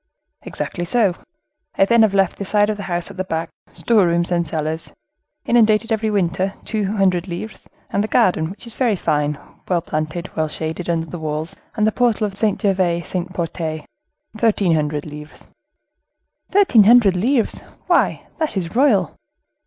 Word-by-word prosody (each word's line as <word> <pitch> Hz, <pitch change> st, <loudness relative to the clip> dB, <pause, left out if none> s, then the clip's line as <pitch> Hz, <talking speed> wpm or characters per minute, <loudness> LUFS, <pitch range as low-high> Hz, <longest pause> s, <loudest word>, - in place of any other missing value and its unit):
"Exactly 175 Hz, -, -5 dB
so. 200 Hz, +1 st, +2 dB, 0.6 s
I 195 Hz, -, +5 dB
then 235 Hz, +2 st, +4 dB
have 210 Hz, -3 st, +3 dB
left 195 Hz, -2 st, +1 dB
the -, -, -2 dB
side 205 Hz, +1 st, +2 dB
of 210 Hz, -, -4 dB
the -, -, -6 dB
house 175 Hz, -1 st, -2 dB
at -, -, -13 dB
the 185 Hz, -, -1 dB
back, 165 Hz, -2 st, -3 dB, 0.2 s
store 215 Hz, -6 st, +2 dB
rooms, 170 Hz, +1 st, 0 dB
and 170 Hz, -1 st, +1 dB
cellars, 155 Hz, +1 st, -3 dB, 0.5 s
inundated 225 Hz, -1 st, +3 dB
every 220 Hz, 0 st, +1 dB
winter, 190 Hz, -1 st, 0 dB
two 210 Hz, -3 st, -1 dB
hundred 185 Hz, -2 st, +2 dB
livres; 185 Hz, +5 st, -7 dB, 0.2 s
and 200 Hz, -, +1 dB
the -, -, -2 dB
garden, 180 Hz, -9 st, +2 dB
which 200 Hz, +5 st, -11 dB
is 235 Hz, -, -9 dB
very 235 Hz, -5 st, +1 dB
fine, 150 Hz, -4 st, 0 dB, 0.3 s
well 175 Hz, -2 st, +2 dB
planted, 155 Hz, +3 st, -4 dB
well 155 Hz, -1 st, 0 dB
shaded 160 Hz, +3 st, -5 dB
under 165 Hz, -1 st, 0 dB
the 175 Hz, +1 st, -8 dB
walls 155 Hz, +4 st, -4 dB, 0.2 s
and 215 Hz, -2 st, +2 dB
the 215 Hz, -, +3 dB
portal 235 Hz, -2 st, +1 dB
of 200 Hz, -2 st, -5 dB
Saint 210 Hz, -1 st, 0 dB
Gervais 185 Hz, -5 st, +1 dB
Saint 180 Hz, +1 st, -4 dB
Protais, 165 Hz, -3 st, -4 dB, 0.5 s
thirteen 210 Hz, -5 st, +2 dB
hundred 150 Hz, -1 st, -1 dB
livres." 150 Hz, 0 st, -11 dB, 1.0 s
"Thirteen 370 Hz, -, +5 dB
hundred 220 Hz, -4 st, +6 dB
livres! 230 Hz, +5 st, +1 dB, 0.3 s
why, -, -, +1 dB
that 310 Hz, -9 st, -1 dB
is 175 Hz, +1 st, -4 dB
royal!" 230 Hz, -, +3 dB
185 Hz, 170 wpm, -20 LUFS, 165-215 Hz, 1.0 s, hundred